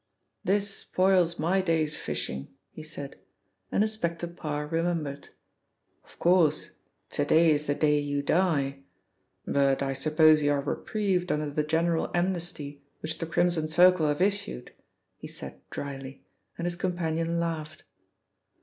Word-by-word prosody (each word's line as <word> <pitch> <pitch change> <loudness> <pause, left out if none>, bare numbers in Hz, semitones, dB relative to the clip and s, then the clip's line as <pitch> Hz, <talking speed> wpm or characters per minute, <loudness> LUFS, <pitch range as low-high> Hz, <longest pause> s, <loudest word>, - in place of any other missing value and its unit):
"This 200 0 0
spoils 185 -2 +2
my 180 +5 +2
day's 160 -4 +1
fishing," 65 +1 -4 0.2
he - - -9
said, 150 -3 -8 0.5
and 205 - +3
Inspector 175 -6 -2
Parr 150 -3 -4
remembered. 165 -3 -2 0.7
"Of - - -21
course, 170 -4 +3 0.4
to 145 - 0
day 160 +2 +5
is 150 0 0
the 145 - +1
day 150 -1 +3
you 145 -1 -2
die! 145 -5 +1 0.7
But 140 -1 +2
I 135 0 -1
suppose 155 +2 +4
you 145 0 +3
are 140 - 0
reprieved 185 +2 -1
under 150 -1 -1
the 150 - 0
general 160 +2 +1
amnesty 175 -5 -2 0.2
which 160 0 -4
the 165 - -3
Crimson 170 -1 +1
Circle 175 0 +5
have 150 +4 +1
issued," 200 -9 -1 0.5
he - - -9
said 65 0 -10
drily, 135 -1 -7 0.3
and 170 - -3
his 175 0 -1
companion 170 -2 -1
laughed. 155 -2 -4
160 Hz, 140 wpm, -28 LUFS, 145-175 Hz, 0.7 s, day